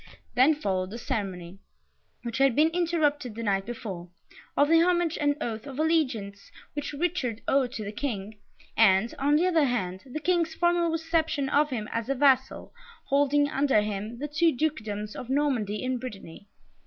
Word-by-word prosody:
Then 270 Hz, +5 st, +5 dB
followed 190 Hz, -9 st, -2 dB
the 225 Hz, -, -7 dB
ceremony, 195 Hz, -7 st, -4 dB, 0.6 s
which 235 Hz, 0 st, -4 dB
had 270 Hz, -3 st, +4 dB
been 310 Hz, +2 st, +4 dB
interrupted 315 Hz, -8 st, 0 dB
the 230 Hz, -, -5 dB
night 195 Hz, -2 st, 0 dB
before, 195 Hz, -7 st, -6 dB, 0.5 s
of 285 Hz, -, +5 dB
the 330 Hz, +1 st, +5 dB
homage 345 Hz, -2 st, +2 dB
and 290 Hz, 0 st, +2 dB
oath 225 Hz, -1 st, -4 dB
of 270 Hz, -2 st, -8 dB
allegiance 260 Hz, -11 st, -1 dB, 0.2 s
which 290 Hz, -1 st, -4 dB
Richard 285 Hz, -8 st, -2 dB
owed 270 Hz, -3 st, +2 dB
to 215 Hz, -, -5 dB
the 205 Hz, -, -5 dB
King, 215 Hz, -4 st, -5 dB, 0.4 s
and, 215 Hz, 0 st, +4 dB
on 290 Hz, +2 st, +3 dB
the 330 Hz, +4 st, +3 dB
other 330 Hz, -5 st, +3 dB
hand, 190 Hz, -8 st, -2 dB
the 310 Hz, -, -3 dB
King's 335 Hz, -1 st, 0 dB
formal 345 Hz, 0 st, +2 dB
reception 320 Hz, -3 st, 0 dB
of 295 Hz, +2 st, +3 dB
him 225 Hz, -6 st, -4 dB
as 230 Hz, +2 st, -3 dB
a 275 Hz, -, +1 dB
vassal, 265 Hz, -1 st, +2 dB, 0.4 s
holding, 285 Hz, +1 st, +3 dB
under 275 Hz, -6 st, +2 dB
him, 210 Hz, +2 st, -4 dB
the 290 Hz, +4 st, -4 dB
two 320 Hz, +3 st, +2 dB
dukedoms 215 Hz, -8 st, -3 dB
of 250 Hz, -, -7 dB
Normandy 255 Hz, -7 st, 0 dB
and 255 Hz, -1 st, -1 dB
Brittany. 200 Hz, -6 st, -9 dB
265 Hz, 170 wpm, -27 LUFS, 215-305 Hz, 0.6 s, Then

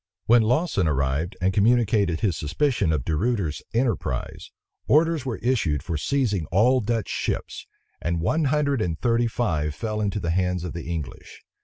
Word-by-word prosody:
When 120 Hz, +1 st, +6 dB
Lawson 120 Hz, -, +1 dB
arrived, 75 Hz, +5 st, -1 dB
and 95 Hz, +1 st, +2 dB
communicated 105 Hz, -4 st, +2 dB
his 95 Hz, -6 st, +1 dB
suspicion 85 Hz, -, 0 dB
of 75 Hz, -6 st, -1 dB
De 80 Hz, -, 0 dB
Ruyter's 100 Hz, -5 st, -1 dB
enterprise, 115 Hz, -, -2 dB, 0.4 s
orders 155 Hz, -2 st, +3 dB
were 115 Hz, -, -2 dB
issued 95 Hz, -, +1 dB
for 85 Hz, -, -3 dB
seizing 105 Hz, -, 0 dB
all 125 Hz, +8 st, +3 dB
Dutch 115 Hz, -1 st, -1 dB
ships; -, -, -3 dB, 0.3 s
and 85 Hz, 0 st, -1 dB
one 155 Hz, -, +1 dB
hundred 140 Hz, -3 st, +1 dB
and 85 Hz, -6 st, -2 dB
thirty 120 Hz, -1 st, +2 dB
five 80 Hz, -11 st, -1 dB
fell 110 Hz, -2 st, -3 dB
into 105 Hz, 0 st, -1 dB
the 85 Hz, -3 st, -2 dB
hands 90 Hz, 0 st, 0 dB
of 90 Hz, -, -5 dB
the 85 Hz, -1 st, -6 dB
English. 80 Hz, -6 st, -7 dB
100 Hz, 165 wpm, -24 LUFS, 80-120 Hz, 0.4 s, When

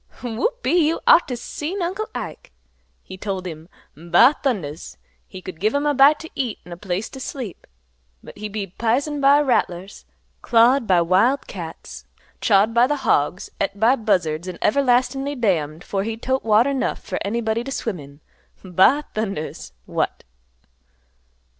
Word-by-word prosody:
Whoop 250 Hz, -, -2 dB
e -, -, +2 dB
e, 340 Hz, -3 st, +4 dB
you 330 Hz, -, 0 dB
ought 345 Hz, -, +6 dB
t' 250 Hz, -, -3 dB
seen 300 Hz, +9 st, -5 dB
Uncle 385 Hz, +5 st, -3 dB
Ike! -, -, -7 dB, 0.5 s
He 185 Hz, -, -11 dB
told 190 Hz, -2 st, -4 dB
him, 160 Hz, -1 st, -8 dB, 0.3 s
'Ba 175 Hz, -, +4 dB
thundas!' 180 Hz, -, -3 dB, 0.3 s
he 185 Hz, -1 st, -11 dB
could 180 Hz, -4 st, -8 dB
give 215 Hz, +7 st, +1 dB
him 285 Hz, +1 st, 0 dB
a 295 Hz, -, +2 dB
bite 280 Hz, +2 st, +6 dB
to 320 Hz, -, -9 dB
eat 250 Hz, -6 st, -3 dB
an' 180 Hz, -, -13 dB
a -, -, -5 dB
place 190 Hz, +2 st, -3 dB
to 265 Hz, -, -10 dB
sleep, 250 Hz, -7 st, -7 dB, 0.6 s
but -, -, -12 dB
he'd 210 Hz, 0 st, -7 dB
be 205 Hz, -1 st, -3 dB
pisined 235 Hz, -, -1 dB
bit -, -, -4 dB
by 280 Hz, +2 st, +6 dB
rattlers, 195 Hz, -8 st, -1 dB, 0.4 s
clawed 240 Hz, +1 st, +4 dB
by 180 Hz, -3 st, +4 dB
wild 195 Hz, +11 st, +2 dB
cats, -, -, -9 dB, 0.4 s
chawed 210 Hz, +1 st, +3 dB
by 235 Hz, +2 st, +4 dB
the 295 Hz, -, 0 dB
hogs, 145 Hz, +6 st, +1 dB
et 195 Hz, 0 st, -2 dB
by 230 Hz, +5 st, +4 dB
buzzards, 180 Hz, -8 st, 0 dB
an' 180 Hz, -2 st, -6 dB
everlastin'ly 270 Hz, +3 st, +1 dB
damned 165 Hz, -, -1 dB
'fore 195 Hz, -, -2 dB
he'd 225 Hz, +1 st, -5 dB
tote 260 Hz, +1 st, 0 dB
water 225 Hz, +5 st, +3 dB
'nough 270 Hz, -, -2 dB
fer -, -, -4 dB
anybody 225 Hz, +2 st, -1 dB
t' 270 Hz, -, -7 dB
swim 225 Hz, -8 st, -3 dB
in. 140 Hz, +1 st, -14 dB, 0.4 s
'Ba 195 Hz, -, +3 dB
thundas! 195 Hz, -8 st, -4 dB
What! -, -, -2 dB
225 Hz, 170 wpm, -22 LUFS, 185-270 Hz, 0.6 s, ought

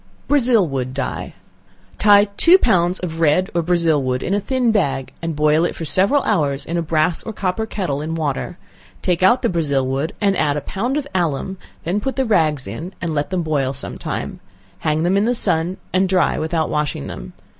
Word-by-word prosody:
Brazil 250 Hz, -8 st, +3 dB
Wood 130 Hz, -2 st, -3 dB
Dye. 140 Hz, -, -4 dB, 0.6 s
Tie 205 Hz, 0 st, +6 dB
two 345 Hz, -, +7 dB
pounds 180 Hz, -, +2 dB
of 165 Hz, -3 st, -5 dB
red 165 Hz, +4 st, +2 dB
or 170 Hz, -, +1 dB
Brazil 165 Hz, -3 st, +2 dB
wood 130 Hz, -1 st, -2 dB
in 195 Hz, -, -1 dB
a 205 Hz, -, +2 dB
thin 250 Hz, +2 st, 0 dB
bag, 135 Hz, -11 st, -1 dB
and 165 Hz, -1 st, -3 dB
boil 150 Hz, +2 st, +3 dB
it 175 Hz, -, -1 dB
for 165 Hz, -, -5 dB
several 195 Hz, -, +3 dB
hours 145 Hz, -9 st, 0 dB
in 170 Hz, -, -4 dB
a 170 Hz, -, +1 dB
brass 160 Hz, +1 st, +1 dB
or 225 Hz, -, -6 dB
copper 205 Hz, +1 st, -2 dB
kettle 175 Hz, -10 st, -3 dB
in 160 Hz, +2 st, -3 dB
water; 155 Hz, +2 st, -3 dB, 0.5 s
take 180 Hz, -1 st, 0 dB
out 235 Hz, +8 st, +4 dB
the -, -, +3 dB
Brazil 145 Hz, -, 0 dB
wood 135 Hz, +4 st, -2 dB
and 200 Hz, -2 st, +2 dB
add 150 Hz, -4 st, +1 dB
a -, -, -2 dB
pound 240 Hz, -, -2 dB
of 295 Hz, -, -2 dB
alum, 175 Hz, +1 st, -1 dB, 0.3 s
then 180 Hz, +5 st, -1 dB
put 265 Hz, +5 st, -3 dB
the 265 Hz, -, 0 dB
rags 155 Hz, -, +2 dB
in, 155 Hz, -, -7 dB
and 170 Hz, -2 st, -3 dB
let 145 Hz, -1 st, -1 dB
them 185 Hz, -2 st, -1 dB
boil 140 Hz, -4 st, 0 dB
some 140 Hz, -, -5 dB
time; -, -, -5 dB, 0.4 s
hang 155 Hz, 0 st, 0 dB
them 180 Hz, +3 st, +2 dB
in 200 Hz, -, +2 dB
the 245 Hz, +2 st, +1 dB
sun, 170 Hz, -3 st, +1 dB, 0.2 s
and 185 Hz, 0 st, +2 dB
dry 185 Hz, -2 st, +2 dB
without 160 Hz, 0 st, -1 dB
washing 150 Hz, -, -2 dB
them. -, -, -8 dB
170 Hz, 210 wpm, -20 LUFS, 150-195 Hz, 0.6 s, two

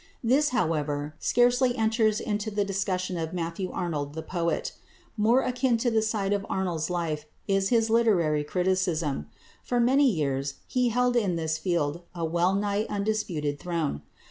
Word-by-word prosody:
This, 270 Hz, +6 st, +3 dB
however, 150 Hz, -, -1 dB
scarcely 245 Hz, +1 st, +3 dB
enters 220 Hz, -1 st, +2 dB
into 210 Hz, 0 st, -2 dB
the 205 Hz, -1 st, 0 dB
discussion 185 Hz, -2 st, -2 dB
of 160 Hz, 0 st, -3 dB
Matthew 170 Hz, +2 st, -3 dB
Arnold 150 Hz, -4 st, -3 dB
the 160 Hz, -, -4 dB
poet. 170 Hz, -2 st, -1 dB, 0.4 s
More 230 Hz, +4 st, +4 dB
akin 250 Hz, -1 st, +1 dB
to 240 Hz, +1 st, 0 dB
that 220 Hz, -1 st, +3 dB
side 210 Hz, -2 st, 0 dB
of 200 Hz, -1 st, -1 dB
Arnold's 175 Hz, -4 st, -1 dB
life 160 Hz, -4 st, -2 dB, 0.2 s
is 195 Hz, 0 st, +2 dB
his 230 Hz, -2 st, +3 dB
literary 190 Hz, -10 st, +3 dB
criticism. 170 Hz, -, 0 dB, 0.4 s
For 245 Hz, -, 0 dB
many 265 Hz, +3 st, +4 dB
years 140 Hz, -, -1 dB
he 250 Hz, -1 st, +1 dB
held 250 Hz, +1 st, +1 dB
in 200 Hz, -7 st, +2 dB
this 160 Hz, -1 st, -1 dB
field 170 Hz, -3 st, -1 dB
a 170 Hz, -1 st, -2 dB
well 175 Hz, +3 st, +1 dB
nigh 205 Hz, +1 st, 0 dB
undisputed 200 Hz, -9 st, -1 dB
throne. 165 Hz, -, -2 dB
190 Hz, 155 wpm, -27 LUFS, 160-225 Hz, 0.4 s, More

